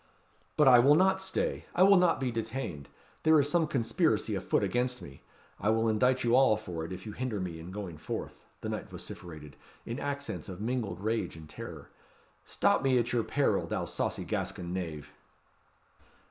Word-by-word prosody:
"But 150 Hz, -, +5 dB
I 125 Hz, -2 st, +9 dB
will 140 Hz, +5 st, +6 dB
not 190 Hz, +3 st, +3 dB
stay. 190 Hz, 0 st, -2 dB
I 180 Hz, -, +5 dB
will 200 Hz, +1 st, +7 dB
not 180 Hz, -3 st, +4 dB
be 130 Hz, -2 st, -1 dB
detained. 110 Hz, -, -4 dB, 0.3 s
There 160 Hz, -1 st, +5 dB
is 145 Hz, -, +2 dB
some 170 Hz, -2 st, +3 dB
conspiracy 120 Hz, -, +1 dB
a 95 Hz, -, -2 dB
foot 95 Hz, +2 st, +1 dB
against 125 Hz, +5 st, 0 dB
me. 70 Hz, -1 st, -12 dB, 0.4 s
I 105 Hz, -, +1 dB
will 115 Hz, +1 st, +2 dB
indict 125 Hz, +4 st, +2 dB
you 120 Hz, 0 st, +3 dB
all 130 Hz, -5 st, +5 dB
for 90 Hz, -6 st, -6 dB
it, 85 Hz, -, -6 dB
if 90 Hz, 0 st, -7 dB
you 110 Hz, -, -5 dB
hinder 120 Hz, -2 st, -3 dB
me 90 Hz, -3 st, -4 dB
in 80 Hz, +2 st, -9 dB
going 95 Hz, -5 st, -6 dB
forth," -, -, -6 dB, 0.2 s
the -, -, -4 dB
knight -, -, -4 dB
vociferated, 75 Hz, -5 st, -9 dB, 0.3 s
in 115 Hz, +4 st, -4 dB
accents 140 Hz, -5 st, -4 dB
of 90 Hz, -1 st, -7 dB
mingled 110 Hz, -5 st, -2 dB
rage 110 Hz, -5 st, -1 dB
and 80 Hz, -1 st, -11 dB
terror. -, -, -9 dB, 0.6 s
"Stop -, -, +2 dB
me 135 Hz, -1 st, +3 dB
at 120 Hz, 0 st, 0 dB
your 120 Hz, -2 st, +2 dB
peril, -, -, +1 dB
thou -, -, -2 dB
saucy -, -, -2 dB
Gascon 85 Hz, 0 st, -3 dB
knave." 80 Hz, -5 st, -5 dB
115 Hz, 190 wpm, -30 LUFS, 90-135 Hz, 0.6 s, I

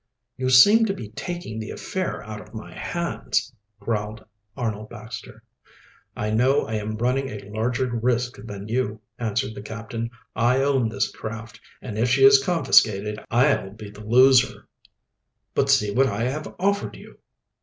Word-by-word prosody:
"You 130 Hz, 0 st, -1 dB
seem 205 Hz, -, +7 dB
to 195 Hz, -, -1 dB
be 110 Hz, -, -8 dB
taking 145 Hz, -1 st, -6 dB
the 110 Hz, -, -6 dB
affair 185 Hz, -, -4 dB
out 105 Hz, 0 st, -7 dB
of -, -, -15 dB
my 110 Hz, -, -8 dB
hands," 170 Hz, -7 st, -2 dB, 0.3 s
growled 105 Hz, 0 st, -3 dB, 0.3 s
Arnold 110 Hz, -2 st, -3 dB
Baxter. 115 Hz, +1 st, -9 dB, 0.7 s
"I 105 Hz, 0 st, -2 dB
know 130 Hz, +6 st, +3 dB
I 110 Hz, -, -5 dB
am 110 Hz, 0 st, -3 dB
running 130 Hz, +3 st, 0 dB
a 105 Hz, -4 st, -8 dB
larger 115 Hz, +4 st, 0 dB
risk 120 Hz, +1 st, -1 dB
than 100 Hz, -2 st, -7 dB
you," 110 Hz, -2 st, -1 dB, 0.2 s
answered 110 Hz, -1 st, -1 dB
the -, -, -8 dB
captain. 115 Hz, +2 st, -5 dB, 0.3 s
"I 125 Hz, +4 st, +3 dB
own 135 Hz, -5 st, +2 dB
this 100 Hz, -1 st, -1 dB
craft, 115 Hz, +1 st, -7 dB, 0.2 s
and 110 Hz, -4 st, -5 dB
if 120 Hz, +2 st, +2 dB
she 135 Hz, +2 st, +3 dB
is 135 Hz, 0 st, +7 dB
confiscated 110 Hz, -, +3 dB
I'll 125 Hz, -3 st, +2 dB
be 105 Hz, -1 st, -10 dB
the 105 Hz, +1 st, -12 dB
loser." 130 Hz, +3 st, +4 dB, 0.9 s
"But -, -, +1 dB
see 105 Hz, -1 st, +4 dB
what 135 Hz, +3 st, +4 dB
I 105 Hz, 0 st, -2 dB
have 140 Hz, +5 st, -3 dB
offered 200 Hz, +2 st, 0 dB
you." -, -, -15 dB
115 Hz, 160 wpm, -24 LUFS, 110-130 Hz, 0.9 s, seem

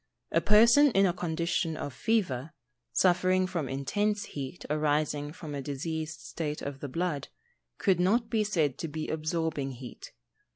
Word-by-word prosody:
A 165 Hz, -, +3 dB
person 235 Hz, -, +7 dB
in 195 Hz, 0 st, +5 dB
a 180 Hz, -, +2 dB
condition 170 Hz, -1 st, -1 dB
of 145 Hz, -, -5 dB
fever, 160 Hz, -, 0 dB, 0.4 s
suffering 185 Hz, 0 st, +3 dB
from 170 Hz, -7 st, -3 dB
intense 205 Hz, +10 st, -1 dB
heat 140 Hz, +4 st, -7 dB
arising 150 Hz, -1 st, 0 dB
from 155 Hz, -2 st, -8 dB
a 140 Hz, -, -3 dB
diseased 155 Hz, +3 st, -4 dB
state 150 Hz, -2 st, -4 dB
of 140 Hz, -1 st, -5 dB
the 145 Hz, -, -5 dB
blood, 155 Hz, -1 st, -2 dB, 0.5 s
could 190 Hz, -4 st, +2 dB
not 220 Hz, +6 st, +3 dB
be 220 Hz, -1 st, +1 dB
said 160 Hz, -10 st, 0 dB
to 165 Hz, -, -3 dB
be 155 Hz, +1 st, -4 dB
absorbing 155 Hz, -3 st, -2 dB
heat. 125 Hz, 0 st, -10 dB
160 Hz, 155 wpm, -29 LUFS, 145-185 Hz, 0.5 s, person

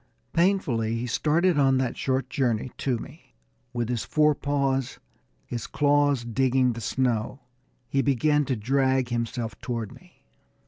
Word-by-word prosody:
Painfully 140 Hz, -, +1 dB
he 115 Hz, +1 st, -3 dB
started 155 Hz, +6 st, +2 dB
on 135 Hz, -1 st, +4 dB
that 130 Hz, -2 st, -1 dB
short 130 Hz, 0 st, -1 dB
journey 125 Hz, -2 st, -1 dB
to 130 Hz, -3 st, 0 dB
me. 145 Hz, +8 st, -12 dB, 0.4 s
With 120 Hz, -2 st, -2 dB
his 120 Hz, -2 st, -2 dB
forepaws, 140 Hz, -3 st, +1 dB, 0.5 s
his 120 Hz, -, -5 dB
claws 145 Hz, -3 st, +2 dB
digging 130 Hz, +1 st, +2 dB
the 115 Hz, -, -7 dB
snow, 125 Hz, +2 st, -1 dB, 0.5 s
he 135 Hz, +2 st, +1 dB
began 145 Hz, +2 st, +2 dB
to 135 Hz, -, -1 dB
drag 130 Hz, +2 st, +1 dB
himself 115 Hz, -1 st, -3 dB
toward 115 Hz, -4 st, -4 dB
me. -, -, -20 dB
130 Hz, 135 wpm, -26 LUFS, 120-140 Hz, 0.5 s, on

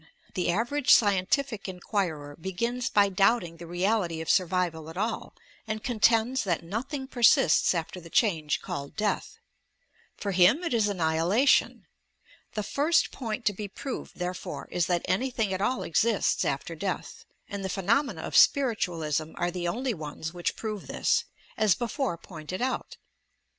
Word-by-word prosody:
The 180 Hz, -2 st, -1 dB
average 240 Hz, +9 st, +1 dB
scientific 205 Hz, +3 st, +3 dB
inquirer 175 Hz, -6 st, -3 dB
begins 235 Hz, +9 st, -2 dB
by 200 Hz, -1 st, +4 dB
doubting 195 Hz, -3 st, +2 dB
the 170 Hz, 0 st, -10 dB
reality 175 Hz, -1 st, 0 dB
of 160 Hz, -, 0 dB
survival 175 Hz, -3 st, 0 dB
at 165 Hz, -, -10 dB
all, 220 Hz, +3 st, -3 dB, 0.3 s
and 215 Hz, 0 st, -3 dB
contends 235 Hz, +1 st, +2 dB
that 175 Hz, -5 st, -1 dB
nothing 260 Hz, -, -4 dB
persists 235 Hz, -, +4 dB
after 170 Hz, +2 st, -4 dB
the 165 Hz, -, -12 dB
change 160 Hz, -8 st, +1 dB
called 140 Hz, 0 st, -6 dB
death. 215 Hz, -1 st, -2 dB, 0.8 s
For 200 Hz, -, -3 dB
him 190 Hz, -, +5 dB
it 340 Hz, -, -1 dB
is 220 Hz, -3 st, +3 dB
annihilation! 180 Hz, -, +2 dB, 0.7 s
The 210 Hz, -, -1 dB
first 305 Hz, +9 st, +2 dB
point 230 Hz, -1 st, -5 dB
to 205 Hz, -, +3 dB
be 205 Hz, +2 st, -5 dB
proved, 255 Hz, +6 st, -7 dB
therefore, 180 Hz, 0 st, -5 dB
is 175 Hz, -1 st, +1 dB
that 175 Hz, -2 st, 0 dB
anything 225 Hz, -1 st, 0 dB
at 185 Hz, -, -2 dB
all 255 Hz, +5 st, 0 dB
exists 225 Hz, +8 st, +1 dB
after -, -, -2 dB
death, -, -, -4 dB, 0.2 s
and 200 Hz, -1 st, -5 dB
the 190 Hz, -, -2 dB
phe 195 Hz, +1 st, -3 dB
nomena 270 Hz, +8 st, +1 dB
of -, -, -5 dB
spiritualism 170 Hz, -, +2 dB
are 175 Hz, 0 st, -1 dB
the 175 Hz, -1 st, -3 dB
only 245 Hz, +7 st, -1 dB
ones 160 Hz, -1 st, -6 dB
which 175 Hz, -1 st, -2 dB
prove 215 Hz, -3 st, -5 dB
this, -, -, +1 dB, 0.3 s
as 210 Hz, -5 st, +4 dB
before 240 Hz, -3 st, -2 dB
pointed 165 Hz, +1 st, -7 dB
out. 255 Hz, +1 st, -2 dB
195 Hz, 155 wpm, -28 LUFS, 175-230 Hz, 0.8 s, him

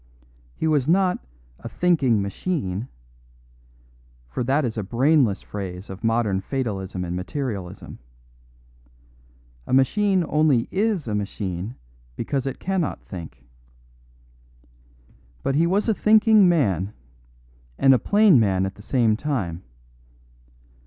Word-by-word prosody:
He -, -, -3 dB
was 150 Hz, -4 st, +2 dB
not 185 Hz, +2 st, +2 dB, 0.4 s
"a -, -, -8 dB
thinking 135 Hz, -, +2 dB
machine"; 100 Hz, -, -3 dB, 1.4 s
for 60 Hz, -, -3 dB
that 135 Hz, +4 st, +1 dB
is 115 Hz, -, -3 dB
a 110 Hz, -, -2 dB
brainless 120 Hz, +1 st, +2 dB
phrase 95 Hz, -1 st, -7 dB
of 95 Hz, +3 st, -10 dB
modern 115 Hz, -4 st, +1 dB
fatalism 95 Hz, -7 st, -3 dB
and 85 Hz, 0 st, -4 dB
materialism. 95 Hz, -1 st, -5 dB, 1.7 s
A -, -, -3 dB
machine 185 Hz, +7 st, +3 dB
only 150 Hz, -6 st, +2 dB
is 200 Hz, -, 0 dB
a 110 Hz, -, -2 dB
machine 100 Hz, 0 st, -4 dB, 0.4 s
because 135 Hz, +2 st, -2 dB
it 135 Hz, -, -4 dB
cannot 185 Hz, -4 st, -2 dB
think. 85 Hz, -4 st, -9 dB, 2.0 s
But -, -, 0 dB
he 160 Hz, +4 st, +3 dB
was 200 Hz, +6 st, +1 dB
a 225 Hz, -, +3 dB
thinking 215 Hz, -2 st, +5 dB
man, 100 Hz, -, +1 dB, 0.8 s
and 135 Hz, -, +5 dB
a 125 Hz, -, +3 dB
plain 205 Hz, -, +5 dB
man 95 Hz, -4 st, +2 dB
at 95 Hz, -, -4 dB
the 105 Hz, -, -15 dB
same 115 Hz, -1 st, +2 dB
time. 110 Hz, -, -3 dB
125 Hz, 120 wpm, -23 LUFS, 100-160 Hz, 2.0 s, thinking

